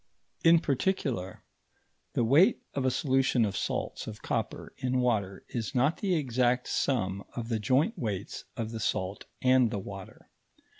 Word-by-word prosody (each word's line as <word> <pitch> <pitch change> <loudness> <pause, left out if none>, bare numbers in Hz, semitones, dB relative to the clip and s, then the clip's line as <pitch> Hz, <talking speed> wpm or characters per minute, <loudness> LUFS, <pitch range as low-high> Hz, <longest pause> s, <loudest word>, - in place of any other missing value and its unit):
In 170 0 +7
particular, 135 - -1 0.7
the - - +1
weight 155 - +5
of 135 -2 -1
a - - +4
solution 130 -3 +2
of 100 -2 -3
salts - - -3
of - - -8
copper - - -3
in 130 0 0
water 105 -6 0
is 120 +2 -4
not 140 +6 +3
the 190 -3 0
exact 125 -3 +1
sum 100 -7 0
of 120 -1 -4
the 115 -2 0
joint 135 - +2
weights 100 -4 -4
of 115 -2 -3
the 115 - -5
salt 95 -2 -2 0.2
and 130 -2 +5
the 105 - -3
water. 95 -1 -9
125 Hz, 155 wpm, -29 LUFS, 105-135 Hz, 0.7 s, In